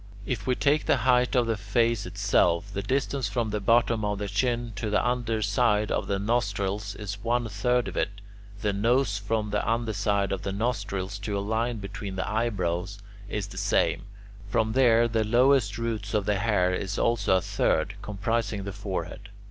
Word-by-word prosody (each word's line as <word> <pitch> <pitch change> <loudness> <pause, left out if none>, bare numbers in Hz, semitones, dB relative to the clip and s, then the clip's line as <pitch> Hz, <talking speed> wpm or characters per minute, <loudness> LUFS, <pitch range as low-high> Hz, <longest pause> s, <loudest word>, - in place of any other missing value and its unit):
If 120 -2 -3
we 125 - +2
take 145 +3 +1
the - - +4
height 125 0 +3
of 125 -1 +4
the 115 -1 0
face 110 0 0
itself, 100 -1 +1
the 100 - -2
distance 130 +2 -1
from 110 +1 -1
the 105 - -1
bottom 115 +1 +2
of 105 0 -1
the 100 0 -3
chin 120 +3 -1
to 105 +1 -2
the 105 +3 +1
under 120 -3 0
side 105 0 +2
of - - -1
the 100 - 0
nostrils 100 -2 -1
is 100 0 -6
one 120 0 +1
third 120 +4 0
of - - -6
it; - - +1 0.5
the 105 -2 0
nose 115 +1 +2
from 105 +1 -2
the 105 - 0
under 115 -1 0
side 100 -1 0
of 95 - -2
the 95 - -3
nostrils 100 -2 -2
to 100 0 -3
a - - 0
line 110 +4 -1
between 100 -1 -6
the 95 - -2
eyebrows 100 -4 -1 0.3
is 105 -1 -2
the - - -6
same; - - +1 0.4
from 110 0 +1
there 120 -2 +5
to 115 -1 -1
the - - +3
lowest 120 -2 +3
roots 110 -3 -3
of 105 -2 +1
the 105 -1 +1
hair 95 -4 +2
is 95 +1 -3
also 115 -5 +2
a - - +2
third, 80 +6 0
comprising 105 0 -2
the 100 0 -5
forehead. 100 0 -5
105 Hz, 195 wpm, -27 LUFS, 100-115 Hz, 0.5 s, there